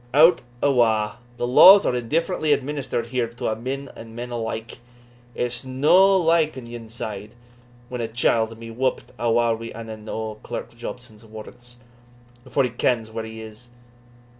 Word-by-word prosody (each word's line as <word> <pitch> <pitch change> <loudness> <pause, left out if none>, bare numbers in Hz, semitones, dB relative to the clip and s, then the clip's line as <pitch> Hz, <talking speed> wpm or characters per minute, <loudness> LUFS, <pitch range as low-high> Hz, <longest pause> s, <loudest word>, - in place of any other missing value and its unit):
Hout 160 +4 +6 0.2
awa! 115 -5 +2 0.2
the 120 - -1
laws 185 +11 +8
are - - +1
indifferently 155 +5 0
administered 140 -3 -2
here 120 0 -1
to 115 0 -4
a' 110 - -1
men 135 +5 -5 0.4
alike; 115 -1 -5 0.6
it's 120 -1 -2
no 155 +10 +4
like 165 -4 +2
on 125 - -8
yon 115 -1 -9
side, 110 -1 -6 0.5
when 125 -1 -5
a 115 - -2
chield 115 -1 0
may 115 0 -9
be - - -9
whuppit 130 +1 -1
awa' 120 0 +2
wi' 115 +1 -8
ane 110 -1 -8
o' 110 -1 -5
Clerk - - -7
Jobson's 120 -2 -9
warrants, 115 +2 -11 0.7
afore 135 +1 0
he 125 - -1
kens 115 -2 0
where 110 0 -5
he 110 0 -8
is. 110 +2 -11
120 Hz, 155 wpm, -23 LUFS, 110-130 Hz, 0.7 s, laws